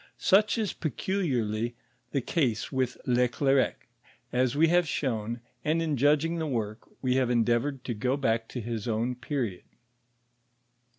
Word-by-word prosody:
Such 210 Hz, +4 st, +4 dB
is 215 Hz, -3 st, -1 dB
peculiarly 120 Hz, -, -1 dB, 0.4 s
the 140 Hz, -, 0 dB
case 125 Hz, -6 st, 0 dB
with 130 Hz, -2 st, -1 dB
Le 125 Hz, 0 st, +3 dB
Clercq, 135 Hz, +1 st, +2 dB, 0.6 s
as 130 Hz, +1 st, +2 dB
we 160 Hz, +3 st, +5 dB
have 175 Hz, 0 st, +3 dB
shown, 120 Hz, -5 st, -2 dB, 0.2 s
and 155 Hz, +2 st, +1 dB
in 160 Hz, -3 st, 0 dB
judging 150 Hz, +5 st, +3 dB
the 160 Hz, -, -1 dB
work, 110 Hz, -5 st, -3 dB
we 130 Hz, 0 st, +2 dB
have 130 Hz, -2 st, +2 dB
endeavored 120 Hz, +3 st, +1 dB
to 120 Hz, -, -2 dB
go 125 Hz, +5 st, 0 dB
back 115 Hz, -4 st, 0 dB
to 125 Hz, -, -5 dB
his 115 Hz, 0 st, -4 dB
own 115 Hz, +2 st, 0 dB
period. 120 Hz, -6 st, -3 dB
125 Hz, 145 wpm, -28 LUFS, 115-150 Hz, 0.6 s, we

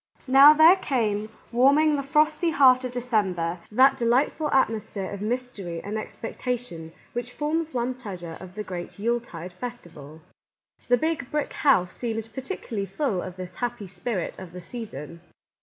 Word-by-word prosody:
Now 275 Hz, +3 st, +9 dB
there 325 Hz, +5 st, +8 dB
came, 220 Hz, -, -1 dB, 0.2 s
warming 285 Hz, +5 st, +4 dB
the 280 Hz, -, -1 dB
frosty 305 Hz, +4 st, +2 dB
heart 260 Hz, -4 st, +5 dB
of 255 Hz, -, -3 dB
December, 195 Hz, -9 st, -1 dB
that 265 Hz, +5 st, +5 dB
delightful 260 Hz, +5 st, +1 dB
atmosphere 215 Hz, -6 st, 0 dB
of 200 Hz, -1 st, -6 dB
mystery 215 Hz, -7 st, -3 dB
and 205 Hz, +4 st, -5 dB
expectation 225 Hz, -6 st, -5 dB, 0.2 s
which 240 Hz, 0 st, -4 dB
forms 315 Hz, +3 st, -2 dB
one 245 Hz, 0 st, -1 dB
pleas 205 Hz, -9 st, -8 dB
ure 165 Hz, -1 st, -6 dB
of 185 Hz, 0 st, -11 dB
the 210 Hz, -, -4 dB
great 180 Hz, -3 st, -7 dB
Yule 235 Hz, +4 st, +1 dB
tide 180 Hz, -6 st, -9 dB
festival. 165 Hz, -, -9 dB, 0.6 s
The 245 Hz, -, +4 dB
Big 310 Hz, -2 st, -2 dB
Brick 300 Hz, -1 st, -2 dB
House 185 Hz, -11 st, +3 dB
seemed 225 Hz, -2 st, -4 dB
particularly 255 Hz, -, -4 dB
full 195 Hz, -, -1 dB
of 185 Hz, -1 st, -7 dB
this 185 Hz, -1 st, -8 dB
happy 240 Hz, -4 st, -3 dB
spirit 185 Hz, +1 st, -4 dB
of 185 Hz, -3 st, -10 dB
the 180 Hz, -, -8 dB
season. 170 Hz, -, -8 dB
235 Hz, 155 wpm, -25 LUFS, 185-265 Hz, 0.6 s, Now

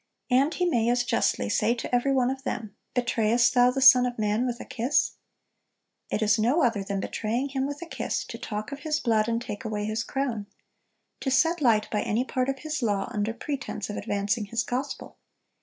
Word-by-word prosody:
And 270 Hz, +5 st, +4 dB
He 360 Hz, -, +1 dB
may 235 Hz, -9 st, +2 dB
as 245 Hz, 0 st, +2 dB
justly -, -, +1 dB
say 235 Hz, -, +2 dB
to 245 Hz, -, -6 dB
every 245 Hz, +3 st, +2 dB
one 260 Hz, -1 st, +2 dB
of 265 Hz, 0 st, -5 dB
them, 215 Hz, -6 st, -5 dB, 0.2 s
'Betrayest 235 Hz, -1 st, +2 dB
thou 245 Hz, -1 st, +5 dB
the 270 Hz, +2 st, -2 dB
Son 250 Hz, -1 st, +8 dB
of 245 Hz, -, -5 dB
man 215 Hz, +3 st, +1 dB
with 240 Hz, 0 st, -3 dB
a -, -, -7 dB
kiss?' 255 Hz, +3 st, +1 dB, 1.0 s
It 220 Hz, -, 0 dB
is 210 Hz, 0 st, +3 dB
no 250 Hz, +10 st, +3 dB
other 230 Hz, -5 st, +1 dB
than 195 Hz, 0 st, -3 dB
betraying 230 Hz, +7 st, -2 dB
Him 270 Hz, 0 st, -1 dB
with 290 Hz, +4 st, -6 dB
a -, -, -7 dB
kiss, 335 Hz, -, -3 dB
to -, -, -8 dB
talk 215 Hz, +4 st, -5 dB
of 280 Hz, -, -6 dB
His 305 Hz, 0 st, -1 dB
blood, 220 Hz, -4 st, +2 dB
and 230 Hz, 0 st, 0 dB
take 235 Hz, -1 st, -6 dB
away 210 Hz, -2 st, -3 dB
His 215 Hz, +1 st, -1 dB
crown; 245 Hz, -7 st, -3 dB, 0.7 s
to 270 Hz, -, -2 dB
set 325 Hz, +5 st, +2 dB
light 220 Hz, -5 st, +3 dB
by 210 Hz, -, 0 dB
any 225 Hz, +4 st, 0 dB
part 255 Hz, 0 st, -1 dB
of 270 Hz, -, -1 dB
His 310 Hz, -2 st, -2 dB
law, 205 Hz, -1 st, -1 dB
under 210 Hz, 0 st, -1 dB
pretense 235 Hz, -4 st, -5 dB
of -, -, -5 dB
advancing 205 Hz, +2 st, -1 dB
His 230 Hz, +3 st, -1 dB
gospel. 265 Hz, +2 st, -4 dB
240 Hz, 210 wpm, -26 LUFS, 215-265 Hz, 1.0 s, Son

